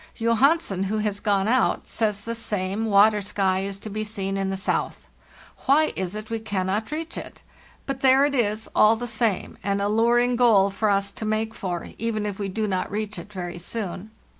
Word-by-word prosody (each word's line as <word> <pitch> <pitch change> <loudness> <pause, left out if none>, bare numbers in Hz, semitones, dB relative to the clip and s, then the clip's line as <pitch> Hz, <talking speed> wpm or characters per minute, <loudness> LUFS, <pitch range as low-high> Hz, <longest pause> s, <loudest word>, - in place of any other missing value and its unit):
"Johansen, 230 - +2
who 210 +3 -1
has 210 -1 -1
gone 200 -1 +1
out, 255 +3 +1
says 210 -3 -1
the 230 - -4
same 210 -2 -2
water 210 +1 +5
sky 190 -1 0
is 195 0 -3
to 210 +2 -8
be 215 +1 -2
seen 195 -2 -3
in 195 0 -1
the 195 - -2
south. 190 - -2 0.6
Why 300 +4 +4
is 185 +1 -3
it 215 +1 -7
we 225 - -1
cannot 205 0 -2
reach 320 +2 -4
it? - - -11 0.4
But 270 -1 -3
there 265 +1 +5
it 290 - -1
is, 220 -4 0
all 215 +1 +6
the 240 +2 -5
same, 220 -3 -1
an 200 0 0
alluring 235 +4 +2
goal 210 -5 +5
for 215 +2 0
us 200 0 +2
to - - -8
make 215 +1 -1
for, 175 -5 -4
even 215 -2 -1
if 205 -1 -4
we 200 -1 -2
do 215 +3 -2
not 190 -3 -1
reach 210 -1 -4
it 185 +5 -11
very 175 -3 -6
soon. 200 +1 -4
210 Hz, 200 wpm, -24 LUFS, 195-225 Hz, 0.6 s, all